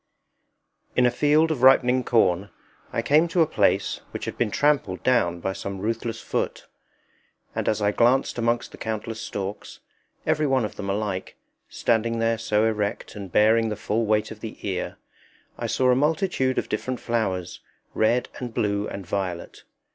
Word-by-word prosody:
In 125 - +4
a 125 - +4
field 150 +4 +3
of 140 -6 -2
ripening 130 -1 +5
corn 100 -5 +2 0.4
I 115 - -1
came 155 +6 +4
to 170 0 +3
a - - +2
place - - +1
which - - -6
had - - -4
been 120 - 0
trampled 140 -8 +1
down 100 -9 +2
by 95 - -2
some 100 0 -5
ruthless 115 +3 -3
foot; - - -3 0.9
and - - -1
as 110 -1 0
I 100 - +3
glanced 120 +3 +2
amongst 120 +1 0
the - - -12
countless 110 0 -4
stalks, 100 -1 -6 0.5
every 155 -1 +2
one 130 -4 +2
of - - -6
them 100 -1 -5
alike, 100 -2 -3 0.3
standing 115 0 0
there 115 0 +1
so 105 +1 +1
erect 105 0 -2
and 100 -3 -7
bearing 110 +3 +4
the 105 - -2
full 110 +2 -1
weight 105 0 +1
of 110 - -9
the 110 -1 -7
ear, 95 -2 -3 0.6
I - - -2
saw 130 -1 +2
a - - +4
multitude 150 -2 +1
of - - 0
different 125 +3 -3
flowers, 95 -7 -2 0.3
red 120 +3 +2
and 125 -2 -5
blue 105 -2 0
and 100 - -7
violet. 90 -2 -4
115 Hz, 170 wpm, -25 LUFS, 105-125 Hz, 0.9 s, ripening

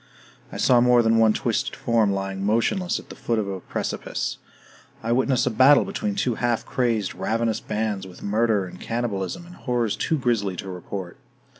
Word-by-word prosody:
I - - -6
saw 125 -2 +4
more 125 -1 +5
than 115 0 +3
one 110 -1 +6
twisted - - -1
form 115 -3 +2
lying 95 0 -3
motionless 115 - +1
at - - -11
the - - -9
foot 115 - -1
of 105 -2 -1
a 95 -1 -4
precipice. - - -4 0.6
I 115 - -1
witnessed 130 +1 +2
a 125 - +1
battle 130 +6 +6
between 210 -1 -3
two 130 -12 0
half 120 0 -1
crazed, 115 -6 0
ravenous 115 +2 -1
bands, 105 -3 -3
with 90 - -13
murder, 105 -1 +1
and 90 0 -11
cannibalism, 115 - -3
and 175 - -13
horrors 120 - -1
too 160 - 0
grisly 115 -8 0
to 95 +1 -6
report. 90 0 -6
115 Hz, 180 wpm, -24 LUFS, 100-120 Hz, 0.6 s, one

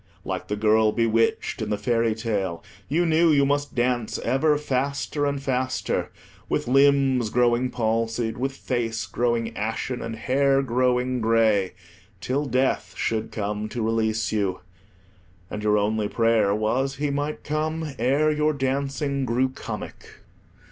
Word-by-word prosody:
Like - - -4
the 105 - -1
girl 110 +1 +3
bewitched 115 0 +1
in 110 - -2
the 105 - 0
fairy 115 +1 +1
tale, 100 -7 -2 0.3
you 170 +4 +2
knew 165 +1 +4
you 140 -2 +4
must 145 +1 -1
dance 120 -2 0
ever 145 +5 +2
faster 140 +1 -1
and 140 0 -1
faster, 130 -1 -1 0.4
with - - -1
limbs 135 -3 +4
growing 125 +2 +2
palsied, 115 -1 -1
with 135 +2 -1
face 115 -4 -2
growing 115 -1 -1
ashen, 115 +3 -3
and 115 -1 -5
hair 135 +3 +2
growing 125 0 +1
grey, 110 -4 +2 0.5
till 135 +10 -1
Death 130 +1 0
should 110 -1 -1
come 105 0 -3
to 115 +1 -3
release 110 -1 0
you; 100 -4 -1 0.9
and 105 - -4
your 105 0 +2
only 105 +1 0
prayer 110 -3 +2
was 130 +6 0
he 145 +1 -1
might 145 +2 -3
come 155 0 -2
ere 140 +6 +2
your 150 0 +1
dancing 140 +1 -1
grew 130 +2 +1
comic. 130 - -8
125 Hz, 140 wpm, -24 LUFS, 110-140 Hz, 0.9 s, knew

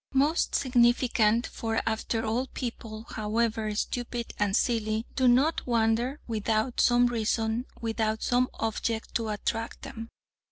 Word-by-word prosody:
Most 295 +5 +2
significant, 240 -2 +3
for 225 -1 -2
after 225 0 -1
all 235 +4 0
people, 225 -4 -6
however 220 0 -1
"stupid" 240 +1 -3
and 205 -1 +2
"silly," 220 -2 0
do 260 -2 +3
not 265 +7 +3
wander 235 +4 +1
without 220 +2 0
some 245 0 +5
reason, 225 0 0
without 220 -1 -1
some 250 +1 +2
object 225 0 -2
to 225 -2 -1
attract 225 +2 -3
them. 225 0 -7
230 Hz, 125 wpm, -28 LUFS, 220-245 Hz, -, some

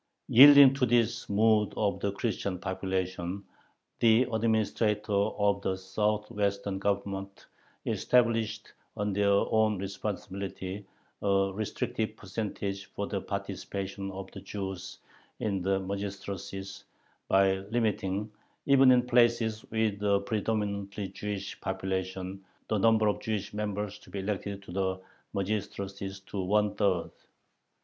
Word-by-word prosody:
Yielding 140 +1 +10
to 135 -1 -2
this 120 -1 +1
mood 105 0 +3
of 100 -2 0
the 100 - -1
Christian 100 -2 -2
population, 95 0 -3 0.6
the 115 +2 +5
administrators 110 -1 +1 0.3
of 100 -1 +2
the 95 -1 0
southwestern 100 0 -1
Governments 100 -1 -3 0.4
established 115 -3 +1 0.2
on 105 -1 -1
their 100 +1 +2
own 110 +1 +3
responsibility 100 0 -5 0.3
a 100 -1 +2
restrictive 110 +1 -3
percentage 100 -1 -4
for - - -4
the - - -3
participation 100 0 -4
of 95 0 -7
Jews 95 -2 -5 0.4
in 100 -3 -1
the 95 +1 +1
magistracies, 100 0 -5 0.4
by 95 0 +4
limiting, 105 -3 -1 0.3
even 135 -1 +6
in 125 -1 +4
places 120 -2 +3
with 110 -2 0
a 100 -1 +3
predominatingly 100 -2 -2
Jewish 105 -2 -5
population, 95 0 -3 0.3
the 110 - +1
number 110 0 +4
of 105 - +1
Jewish 105 -3 -3
members 105 -1 -3
to - - -17
be - - -6
elected 100 0 -3
to 95 - -11
the 95 0 -1 0.4
magistracies 100 -1 -3
to 100 +1 -6
one 105 +2 +2
third. 95 -5 +1
100 Hz, 115 wpm, -29 LUFS, 95-110 Hz, 0.6 s, Yielding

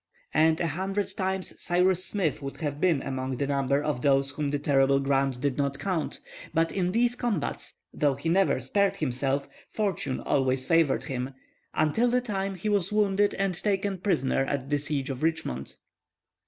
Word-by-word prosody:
And 160 +1 +4
a - - 0
hundred 190 +5 -2
times 190 0 -2
Cyrus 180 +1 +2
Smith 185 -8 -1
would 135 0 -6
have 145 -2 -4
been 170 -7 +3
among 130 -1 -3
the 140 - 0
number 140 0 +1
of 150 -5 -1
those 135 0 +3
whom 145 0 -2
the 145 - 0
terrible 140 -1 +3
Grant 135 -2 +1
did 140 0 -1
not 140 -1 0
count; 160 -6 -2 0.3
but 165 +1 +2
in 180 -2 0
these 240 +3 +2
combats, 240 - -3 0.2
though 145 -2 +2
he 140 +5 -5
never 190 +3 +3
spared 200 -1 +1
himself, 140 -2 -1 0.2
fortune 190 -11 -2
always 130 -2 +1
favored 165 -4 +3
him, 130 -1 -4 0.4
until 155 +11 +2
the 250 +1 +3
time 195 -5 -3
he 185 +4 -5
was 200 -3 +1
wounded 205 -1 +2
and 195 -1 0
taken 200 -2 0
prisoner 135 -9 +1
at 140 0 -3
the 145 - +2
siege 145 -1 -2
of 130 - -6
Richmond. 160 - -2
150 Hz, 175 wpm, -27 LUFS, 135-190 Hz, 0.4 s, And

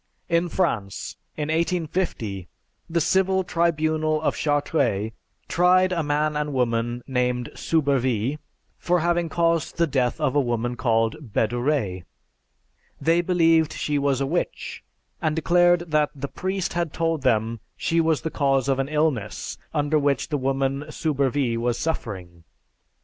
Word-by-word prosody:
In 170 +1 +2
France, 115 - -2 0.2
in 150 0 -2
1850, 160 - -1 0.4
the 170 +1 +1
Civil 190 +3 +2
Tribunal 155 -2 +1
of - - +1
Chartres 140 -8 0 0.4
tried 185 +1 +4
a 175 -2 0
man 150 0 0
and 150 -1 -2
woman 120 -1 0
named 125 -2 -1
Soubervie 135 -4 0 0.4
for 180 -1 +1
having 170 0 +1
caused 165 -1 0
the 170 - +4
death 130 -5 0
of 145 -3 0
a 145 - +5
woman 120 -1 -1
called 115 0 0
Bedouret. 120 -4 0 1.0
They 165 +2 +3
believed 165 -3 +3
she 145 -1 -1
was 140 -2 +1
a 135 - 0
witch, 170 +6 -3 0.4
and 155 -3 0
declared 175 0 +3
that 150 -1 +3
the 140 0 -4
priest 190 +4 -3
had 170 -3 -1
told 165 -2 0
them 115 -3 +1 0.2
she 165 0 +1
was 160 -2 +1
the 160 - -3
cause 135 -2 +1
of 135 -1 +1
an 135 +1 -1
illness 150 -9 -1
under 150 0 +1
which 140 0 0
the 150 - 0
woman 135 +1 0
Soubervie 140 -5 0
was 120 0 0
suffering. 95 - -4
145 Hz, 140 wpm, -24 LUFS, 125-165 Hz, 1.0 s, a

